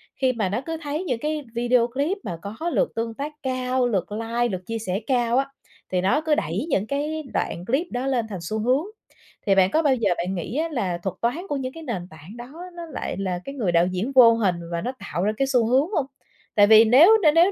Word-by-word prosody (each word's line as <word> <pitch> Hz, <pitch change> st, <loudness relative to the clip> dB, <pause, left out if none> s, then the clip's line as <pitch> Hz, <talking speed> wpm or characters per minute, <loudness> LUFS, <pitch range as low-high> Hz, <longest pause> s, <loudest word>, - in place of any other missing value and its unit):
khi 260 Hz, -1 st, +1 dB
mà 215 Hz, -6 st, -1 dB
nó 205 Hz, +6 st, -2 dB
cứ 325 Hz, 0 st, -3 dB
thấy 300 Hz, +3 st, -3 dB
những 255 Hz, -10 st, -2 dB
cái 305 Hz, +2 st, -2 dB
video 240 Hz, 0 st, +3 dB
clip 285 Hz, -, -1 dB
mà 170 Hz, -, -5 dB
có 220 Hz, -, -4 dB
lượt -, -, +1 dB
tương 230 Hz, 0 st, -2 dB
tác 285 Hz, +6 st, -5 dB
cao, 255 Hz, -1 st, 0 dB
lượt 195 Hz, -5 st, -1 dB
like, 230 Hz, +3 st, -1 dB
lượt 185 Hz, -1 st, -4 dB
chia 230 Hz, 0 st, -3 dB
sẻ 190 Hz, -3 st, -2 dB
cao 245 Hz, -2 st, +2 dB
á, 270 Hz, +1 st, +1 dB, 0.4 s
thì 180 Hz, -1 st, +1 dB
nó 200 Hz, +11 st, +2 dB
cứ 315 Hz, -1 st, +2 dB
đẩy 185 Hz, -, -2 dB
những 210 Hz, -7 st, 0 dB
cái 300 Hz, +4 st, -2 dB
đoạn 175 Hz, -, -2 dB
clip 270 Hz, -, 0 dB
đó 250 Hz, +2 st, -2 dB
lên 250 Hz, -4 st, 0 dB
thành 195 Hz, -4 st, -5 dB
xu 215 Hz, +6 st, -3 dB
hướng. 255 Hz, +7 st, +2 dB, 0.6 s
Thì 195 Hz, -, +4 dB
bạn 190 Hz, 0 st, +4 dB
có 315 Hz, -, +3 dB
bao 285 Hz, -4 st, +3 dB
giờ 225 Hz, -5 st, 0 dB
bạn 180 Hz, +3 st, -2 dB
nghĩ 190 Hz, -, -4 dB
á 325 Hz, +2 st, 0 dB
là 190 Hz, -, -1 dB
thuật 190 Hz, -2 st, -3 dB
toán 235 Hz, +5 st, 0 dB
của 290 Hz, -, -1 dB
những 260 Hz, -1 st, -4 dB
cái 325 Hz, -, -9 dB
nền 200 Hz, -, -4 dB
tảng 160 Hz, +7 st, -13 dB
đó 240 Hz, +3 st, -10 dB, 0.2 s
nó 340 Hz, -1 st, -6 dB
lại 320 Hz, -, -5 dB
là 185 Hz, -2 st, -2 dB
cái 275 Hz, -, -7 dB
người 215 Hz, -10 st, 0 dB
đạo 170 Hz, +1 st, +3 dB
diễn 185 Hz, +8 st, -2 dB
vô 235 Hz, -3 st, +8 dB
hình, 205 Hz, -6 st, +1 dB, 0.2 s
và 170 Hz, 0 st, -2 dB
nó 250 Hz, -, -2 dB
tạo 175 Hz, -, -3 dB
ra 210 Hz, -, +2 dB
cái 270 Hz, -, +1 dB
xu 250 Hz, -4 st, +2 dB
hướng 265 Hz, +7 st, +3 dB
hông? 305 Hz, -10 st, 0 dB, 0.5 s
Tại 205 Hz, -2 st, +6 dB
vì 220 Hz, +1 st, +8 dB
nếu 310 Hz, -, +7 dB
nếu 305 Hz, -, +7 dB
nếu 340 Hz, +4 st, +5 dB
240 Hz, 255 wpm, -24 LUFS, 200-280 Hz, 0.6 s, vô